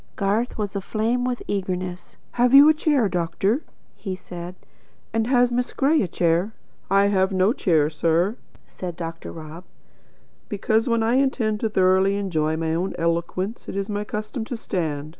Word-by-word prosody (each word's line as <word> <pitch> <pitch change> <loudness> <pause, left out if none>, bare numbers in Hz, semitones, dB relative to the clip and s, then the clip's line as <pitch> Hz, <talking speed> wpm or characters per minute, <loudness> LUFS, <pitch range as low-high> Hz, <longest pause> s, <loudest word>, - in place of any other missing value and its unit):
Garth 210 +5 0
was 210 -2 -3
aflame 225 +5 -1
With 250 -1 -2
eagerness. 185 -2 -4
"Have 245 +2 +3
you 285 +2 +10
a 310 - +7
chair, 295 -7 +2
doctor?" 180 - 0 0.3
he 190 -3 -5
said. 180 -1 -8 0.6
"And 225 0 +1
has 245 -1 +3
Miss 245 +1 -1
Gray 295 +4 +3
a 195 - 0
chair?" 175 +5 +1 0.4
"I 195 +1 +4
have 190 -1 +2
no 190 +3 +3
chair, 160 - +2
sir," 165 +6 +1 0.3
said 180 -2 -7
Dr. 165 -1 -6
Rob, 160 +2 -9 0.9
"because 220 +4 0
when 230 -1 +2
I 235 +3 +2
intend 240 -6 +1
thoroughly 190 -2 +3
to - - -1
enjoy 160 -6 -1
my 160 0 -1
own 180 +4 -2
eloquence 170 +5 -2
it - - -6
is 200 +1 -2
my 205 0 -2
custom 215 +3 -4
to 245 - -5
stand. 155 -9 -3
195 Hz, 165 wpm, -23 LUFS, 175-225 Hz, 0.9 s, you